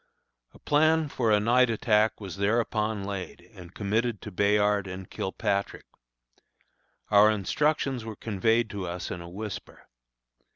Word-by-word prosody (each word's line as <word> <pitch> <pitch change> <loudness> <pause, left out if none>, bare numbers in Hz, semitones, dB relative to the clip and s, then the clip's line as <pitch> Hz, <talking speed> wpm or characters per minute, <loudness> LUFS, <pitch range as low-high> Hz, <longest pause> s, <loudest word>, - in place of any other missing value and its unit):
A - - -13
plan 155 +1 +2
for 120 -4 0
a 105 - +5
night 120 +4 +3
attack 110 -1 +2
was 95 -3 -7
thereupon 105 0 0
laid 95 -4 -5
and 90 -4 -12
committed 110 +2 -1
to 105 - -7
Bayard 105 +1 +2
and 95 0 -7
Kilpatrick. 100 0 -3 1.3
Our 105 +1 +7
instructions 130 - 0
were 110 -1 -7
conveyed 110 +3 +1
to 100 -3 -4
us 85 +1 -5
in 90 - -5
a 85 - -9
whisper. 105 +2 -8
105 Hz, 135 wpm, -27 LUFS, 100-115 Hz, 1.3 s, Our